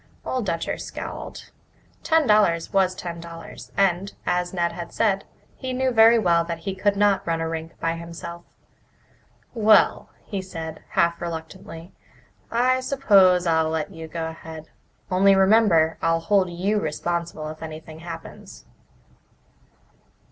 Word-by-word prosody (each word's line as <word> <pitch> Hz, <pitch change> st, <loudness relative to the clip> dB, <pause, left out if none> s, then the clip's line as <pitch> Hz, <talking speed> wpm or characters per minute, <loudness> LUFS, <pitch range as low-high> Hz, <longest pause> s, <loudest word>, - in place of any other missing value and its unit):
Old 250 Hz, -5 st, -2 dB
Dutcher 165 Hz, -2 st, -2 dB
scowled. -, -, -7 dB, 0.5 s
Ten 320 Hz, -1 st, +3 dB
dollars 210 Hz, -7 st, +3 dB
was 190 Hz, -1 st, +2 dB
ten 170 Hz, -2 st, -6 dB
dollars 165 Hz, 0 st, -10 dB
and, 195 Hz, 0 st, +1 dB
as 180 Hz, 0 st, 0 dB
Ned 170 Hz, -2 st, 0 dB
had 170 Hz, -1 st, -7 dB
said, 200 Hz, -3 st, +1 dB, 0.3 s
he 260 Hz, -1 st, -5 dB
knew 260 Hz, 0 st, +1 dB
very 225 Hz, 0 st, +6 dB
well 170 Hz, -6 st, +3 dB
that 170 Hz, 0 st, -4 dB
he 195 Hz, -, -2 dB
could 200 Hz, +2 st, +1 dB
not 200 Hz, -2 st, +2 dB
run 165 Hz, -1 st, 0 dB
a 165 Hz, -, -2 dB
rink 160 Hz, 0 st, -6 dB
by 165 Hz, 0 st, 0 dB
himself. 170 Hz, +1 st, -8 dB, 1.1 s
"Well," 215 Hz, -2 st, +4 dB, 0.2 s
he 200 Hz, -3 st, -4 dB
said, 165 Hz, -4 st, -7 dB
half 170 Hz, 0 st, +2 dB
reluctantly, 165 Hz, +1 st, -7 dB, 0.6 s
"I 255 Hz, +2 st, +2 dB
suppose 200 Hz, -10 st, +4 dB
I'll 160 Hz, -1 st, +2 dB
let 160 Hz, +1 st, -2 dB
you 160 Hz, -1 st, -8 dB
go 165 Hz, +1 st, -4 dB
ahead. 160 Hz, -1 st, -10 dB, 0.4 s
Only 195 Hz, +2 st, +5 dB
remember 190 Hz, -5 st, +4 dB
I'll 165 Hz, 0 st, +2 dB
hold 190 Hz, +1 st, +2 dB
you 190 Hz, +5 st, 0 dB
responsible 165 Hz, -1 st, -3 dB
if 155 Hz, 0 st, -9 dB
anything 160 Hz, 0 st, -8 dB
happens." 170 Hz, 0 st, -10 dB
175 Hz, 140 wpm, -24 LUFS, 165-200 Hz, 1.1 s, very